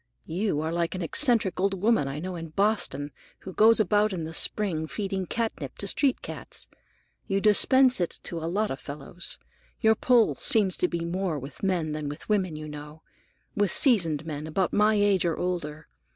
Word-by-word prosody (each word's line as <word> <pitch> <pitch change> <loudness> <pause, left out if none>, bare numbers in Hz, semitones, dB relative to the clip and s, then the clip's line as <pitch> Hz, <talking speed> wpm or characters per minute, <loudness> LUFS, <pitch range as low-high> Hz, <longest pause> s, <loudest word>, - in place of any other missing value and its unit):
You 175 -2 -1
are 160 +1 -2
like 170 +1 -1
an 185 - -3
eccentric 225 - +1
old 195 0 0
woman 215 -7 +2
I 135 +1 -5
know 180 +4 -5
in 165 -1 -6
Boston, 155 -6 -1 0.3
who 190 - -9
goes 225 +3 +5
about 210 +1 +2
in 175 -4 -4
the 160 +1 -6
spring 165 -5 0
feeding 195 -1 -4
catnip 230 -1 -4
to - - -5
street 275 -3 +1
cats. - - -6 0.6
You 195 -1 0
dispense 250 +3 +5
it 175 - -2
to 170 - -3
a 165 +1 -4
lot 210 +4 -1
of 135 - -5
fellows. 145 +6 -6 0.4
Your 220 -1 +4
pull 235 0 +3
seems 200 -5 +2
to 180 - +2
be 170 -1 -3
more 180 -2 -2
with 140 +1 -9
men 180 -5 0
than 150 -1 -4
with 145 - -9
women, 190 -6 0
you 155 0 -7
know; 150 +1 -10 0.5
with 205 -3 +1
seasoned 165 - +3
men, 155 -1 -5
about 180 +4 -1
my 210 +1 +3
age, 205 -3 +2
or 170 -2 -1
older. 155 -4 -4
180 Hz, 190 wpm, -26 LUFS, 155-210 Hz, 0.6 s, goes